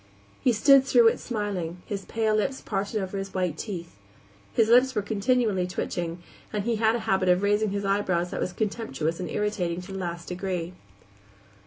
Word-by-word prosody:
He 250 - +4
stood 270 +4 +6
through 240 -4 +6
it - - -3
smiling, 190 -7 -3
his 200 -2 -5
pale 220 -1 0
lips 240 +6 0
parted 200 +1 -2
over 195 0 -3
his 195 0 -6
white 180 -4 0
teeth. 170 - -6 0.5
(His 225 - +3
lips 250 +3 +5
were 210 - 0
continually 215 -3 +1
twitching, 175 -2 -4 0.3
and 210 -1 -2
he 230 +1 0
had 220 +1 +3
a - - -1
habit 190 -1 +2
of 180 +2 +3
raising 205 +1 +2
his 200 0 -2
eyebrows 185 -3 0
that - - -3
was - - -1
contemptuous 180 - -2
and 180 - -4
irritating 195 -5 -1
to 185 +2 -10
the 195 - -5
last 170 -2 -5
degree.) 180 -1 -3
200 Hz, 185 wpm, -26 LUFS, 180-220 Hz, 0.5 s, stood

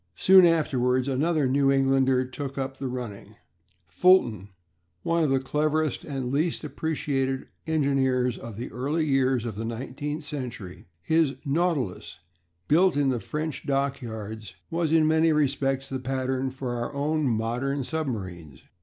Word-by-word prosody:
Soon 190 -1 +7
afterwards 130 -6 +1
another 145 +2 +1
New 135 +1 +3
Englander 135 -1 +3
took 135 +2 -6
up 135 0 -3
the 135 - -3
running, 125 -5 -7 0.5
Fulton 110 - +3 0.5
one 170 0 +1
of 150 - +2
the 135 0 +3
cleverest 150 +2 0
and 135 -4 -4
least 160 +4 0
appreciated 140 -3 -2 0.2
engineers 135 -5 +1
of 115 -3 -9
the 120 - -6
early 145 +6 -1
years 130 -4 +2
of 115 - -3
the 110 +3 -5
nineteenth 135 +6 -4
century. 125 - -7 0.2
His 160 - +2
Nautilus, 145 - -1 0.5
built 175 +1 +4
in 140 -2 +2
the 125 -2 0
French 150 +7 -4
dockyards, 110 -8 -3 0.2
was 165 -1 0
in 160 -1 +4
many 160 +1 +3
respects 135 -2 0
the 130 - -4
pattern 130 0 -2
for 130 -1 -5
our 120 - -3
own 150 +2 0
modern 125 +5 -1
submarines. 95 - -5
135 Hz, 140 wpm, -26 LUFS, 125-150 Hz, 0.5 s, Soon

